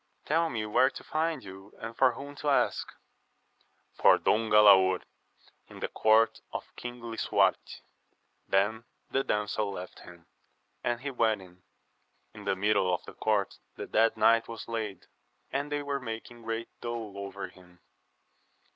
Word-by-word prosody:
Tell 165 +2 +2
me 110 -5 -3
where 105 +5 +4
to - - -10
find 160 +1 -1
you, 95 +1 -12
and 115 +1 -7
for 130 -1 +4
whom 140 +4 -8
to 150 - -1
ask. 140 - +2 0.6
— - - -41
For - - +7
Don 110 +1 +1
Galaor, 95 -3 +6 0.6
in - - -12
the - - -3
court 110 +1 +3
of - - -7
King 120 0 -7
Lisuarte. 115 -1 0 0.7
Then 105 +4 +1 0.3
the 135 - +1
damsel 105 -2 -1
left 90 -1 -8
him, 85 -2 -14 0.6
and 120 0 -1
he 140 +1 -3
went 110 -5 +1
in. 90 0 -18 0.7
In - - -11
the - - +1
middle 95 -1 +2
of 90 - -2
the - - -10
court 105 -3 0 0.2
the - - -6
dead 115 +1 +2
knight 115 +1 +4
was 115 -1 -8
laid, 110 -5 -4 0.5
and 140 +2 -2
they 145 0 -1
were 140 -1 -2
making 115 0 -7
great 115 0 -4
dole 115 -3 -5
over 100 -1 -6
him. 90 -1 -19
110 Hz, 155 wpm, -29 LUFS, 100-120 Hz, 0.7 s, For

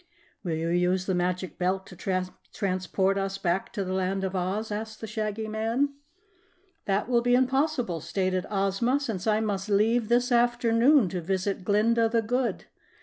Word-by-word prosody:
"Will 170 -4 -1
you 165 +1 -2
use 180 +2 +1
the 190 - 0
Magic 180 +1 -2
Belt 190 +1 0
to 185 - -12 0.6
transport 190 0 0
us 195 0 -2
back 180 0 -1
to 200 - -2
the 185 0 -3
Land 190 +1 -1
of 190 0 -2
Oz?" 195 +4 -2
asked 220 +1 -5
the - - -5
Shaggy 215 0 -3
Man. 225 +6 0 1.0
"That 200 +2 0
will 240 -1 +3
be 245 +1 +3
impossible," 260 - +1
stated 185 +1 -1
Ozma, 205 +6 +1
"since 225 -8 -4
I 215 0 +3
must 205 -2 -2
leave 215 +3 +2
this 245 +1 +2
afternoon 240 +1 +4
to 180 0 -3
visit 190 +2 -2
Glinda 225 +4 +3
the 230 0 +1
Good. 245 +3 -1
205 Hz, 165 wpm, -27 LUFS, 185-230 Hz, 1.0 s, afternoon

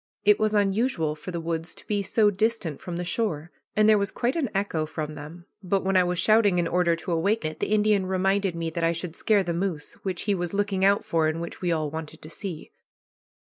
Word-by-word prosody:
It 210 0 +5
was 215 0 +1
unusual 200 -5 +1
for 155 - -9
the 170 -2 -3
woods 165 0 -3
to - - -10
be 205 -1 0
so 205 +2 +3
distant 205 -7 -1
from 175 - -5
the 175 - -2
shore, 175 -4 -2 0.2
and 215 0 +4
there 215 -1 +6
was 200 0 0
quite 240 +5 -1
an 300 -8 0
echo 190 -6 -1
from 155 -1 -5
them, 155 +4 -10 0.2
but 195 0 0
when 190 0 0
I 185 - +6
was 180 0 -1
shouting 215 -1 +4
in 175 -1 +1
order 175 -1 +2
to 165 +2 -6
awake 195 +5 +1
it, 155 0 -4
the - - -2
Indian 210 -2 +3
reminded 190 0 +1
me 165 -1 -3
that 170 +1 -3
I 165 0 +3
should 170 0 -5
scare 205 -1 +2
the 175 -2 -2
moose, 170 -4 -3
which 185 -3 -3
he 205 - +1
was 175 0 -3
looking 200 -2 0
out 200 +1 +4
for, 160 -1 +1
and 155 +1 -1
which 170 0 -7
we 175 -2 0
all 155 -3 -1
wanted 160 -1 -7
to 155 - -10
see. 185 -5 -7
180 Hz, 240 wpm, -26 LUFS, 165-205 Hz, 0.2 s, there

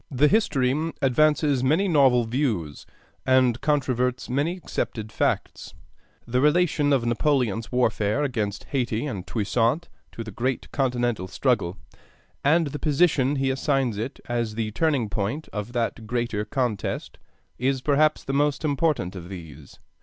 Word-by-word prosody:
The 140 +2 +3
history 155 - +1
advances 145 0 +3
many 160 +9 +2
novel 135 -7 +4
views, 110 - -2 0.4
and 130 -2 +3
controverts 130 -4 0
many 150 +7 0
accepted 110 - -4
facts. - - -2 0.5
The 125 +2 0
relation 150 -1 +3
of 130 -4 +2
Napoleon's 120 -3 0
warfare 120 0 +1
against 110 -7 -2
Hayti 125 -3 -1
and 100 -10 -5
Toussaint 115 +8 0 0.2
to 115 - -6
the 110 - -8
great 125 +5 -2
Continental 120 -7 0
struggle, 100 -3 0 0.7
and 160 +4 +4
the 145 0 -5
position 145 -3 +2
he 135 -1 +1
assigns 135 -5 0
it 120 +5 -5
as 115 -3 -2
the 110 -1 -2
turning 140 -2 +1
point 110 +9 -3
of 105 +2 -4
that 115 -2 -2
greater 120 -3 -1
contest, 120 -6 -3 0.4
is 130 +1 0
perhaps 150 +1 +2
the 135 - -4
most 145 +2 +1
important 145 - 0
of 90 -1 -8
these. 80 -6 -10
130 Hz, 140 wpm, -25 LUFS, 115-145 Hz, 0.7 s, novel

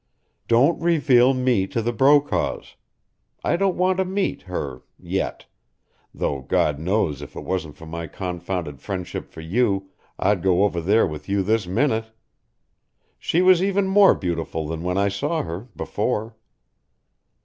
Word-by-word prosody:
Don't 130 +10 +3
reveal 135 -6 +4
me 125 -7 +1
to 95 +5 -2
the 120 +1 -1
Brokaws. 140 +5 +2 0.7
I - - +2
don't 195 +1 +1
want 185 0 +2
to - - +3
meet 190 +2 -1
her 90 -7 -5 0.2
yet, - - -3 0.7
though 70 -2 -2
God 70 +2 +1
knows 85 -4 0
if 70 - -10
it - - -6
wasn't 80 -6 -3
for 80 - -11
my 85 +1 -6
confounded 90 -4 -5
friendship 95 -3 -5
for 80 - -10
you 95 +1 0 0.3
I'd 100 -2 +1
go 95 +1 +3
over 90 -4 0
there 105 +7 +3
with 75 -1 -7
you 100 0 +1
this 110 -1 +1
minute. 110 +3 +1 1.1
She 175 +3 +1
was 185 -1 +6
even 195 0 +1
more 195 0 +6
beautiful 85 -3 -3
than 80 +1 -4
when 90 +2 -1
I 100 +1 +3
saw 100 +12 -1
her 85 +7 -6
before." 110 +2 -2
100 Hz, 150 wpm, -23 LUFS, 85-130 Hz, 1.1 s, was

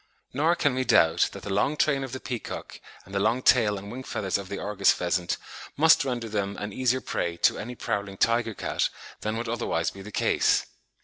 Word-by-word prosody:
Nor 155 +6 +2
can 145 -5 +1
we 130 0 0
doubt 85 -7 +4
that 100 - -10
the 100 - -3
long 140 +10 +1
train 140 -3 +2
of 135 - -6
the 130 - -5
peacock 125 -3 -6 0.2
and 95 - -14
the 100 - +1
long 115 +5 +1
tail 105 -5 +4
and 100 +2 -8
wing 130 - -6
feathers 100 -6 -2
of 95 -2 -8
the 100 - -4
Argus 100 -1 +2
pheasant 90 0 -1 0.4
must 160 +1 +6
render 120 -4 -3
them 100 -2 -2
an 105 -1 -5
easier 130 +2 +1
prey 85 -7 -2
to - - +3
any 125 +3 -6
prowling 100 -3 -3
tiger 115 -1 +1
cat - - -1 0.3
than 110 +1 -2
would 115 0 -3
otherwise 110 -8 -1
be 100 - -11
the 105 +2 -9
case. - - +2
110 Hz, 210 wpm, -26 LUFS, 100-125 Hz, 0.4 s, must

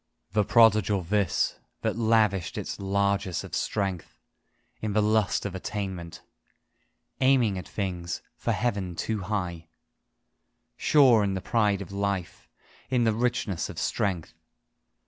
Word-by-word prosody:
The 105 +1 +2
prodigal 105 -3 +4
this, 100 +2 0 0.2
that - - 0
lavished 110 -5 +2
its - - -4
largess 100 -2 0
of - - -10
strength 95 -5 -2 0.6
In 110 -2 -2
the 105 - +3
lust 110 -1 +1
of 100 - -3
attainment. 95 -3 -5 1.0
Aiming 130 -6 +3
at - - -9
things 85 -4 -4
for - - -2
Heaven 100 -7 -1
too 110 +5 -2
high, 90 -4 -3 1.1
Sure 130 -8 +5
in 100 -1 0
the - - -2
pride 105 -1 +1
of 95 - -13
life, 100 -2 -3 0.4
in 125 -2 +2
the 110 -1 +3
richness 115 -6 -1
of - - -9
strength. 90 -5 -1
100 Hz, 125 wpm, -27 LUFS, 95-110 Hz, 1.1 s, Sure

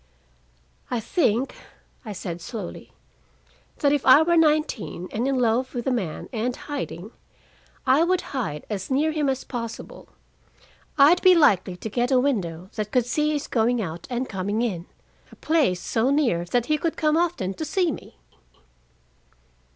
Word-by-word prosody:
"I 245 - -1
think," 245 - 0 0.5
I 220 - -7
said 175 -3 -6
slowly, 205 0 -7 0.9
"that 285 -2 +2
if 290 - 0
I 265 +4 +7
were 340 +1 +2
nineteen, 305 - +1
and 235 +5 -1
in 270 -1 +1
love 250 +2 +1
with 240 - -3
a 265 - +1
man, 195 -11 -3
and 240 +2 -1
hiding, 225 - -6 0.7
I 270 +4 +4
would 360 +1 +1
hide 185 - -3
as 195 -3 -4
near 290 +4 +2
him 300 -3 0
as 265 -1 -2
possible. 230 -3 -7 0.9
I'd 300 +5 +6
be 370 -1 +7
likely 190 - +3
to 200 - -6
get 240 +3 0
a 260 -2 +4
window 190 - -2
that 215 -2 -3
could 250 -3 +2
see 300 +5 0
his 290 - -2
going 235 +1 +1
out 170 -5 -5
and 250 +1 -2
coming 205 +4 -2
in, 185 -7 -3 0.4
a - - -14
place 295 - +1
so 225 +7 0
near 260 - +1
that 235 +6 0
he 305 +2 +1
could 330 +1 -2
come 305 -1 +2
often 330 - 0
to 315 - -5
see 355 +1 +1
me." - - -10
245 Hz, 165 wpm, -24 LUFS, 210-300 Hz, 0.9 s, I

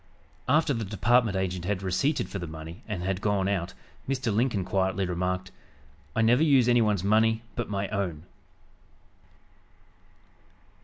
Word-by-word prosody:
After 150 +1 +3
the 115 -3 -2
department 110 +1 +2
agent 90 -2 -2
had 100 0 -2
receipted 95 - 0
for 100 - -5
the 85 - -5
money 80 +5 -9
and 100 -5 -4
had 95 +1 -2
gone 100 -3 +1
out, 95 -2 -2 0.3
Mr. 125 -5 -1
Lincoln 110 -4 +1
quietly 95 0 0
remarked: 90 +1 -2 0.6
"I 115 - +2
never 120 +5 +4
use 140 -6 +4
anyone's 110 -6 +3
money 110 +2 +3
but 120 -3 -3
my 100 -1 -2
own." 95 -7 -3
100 Hz, 140 wpm, -27 LUFS, 95-115 Hz, 0.6 s, never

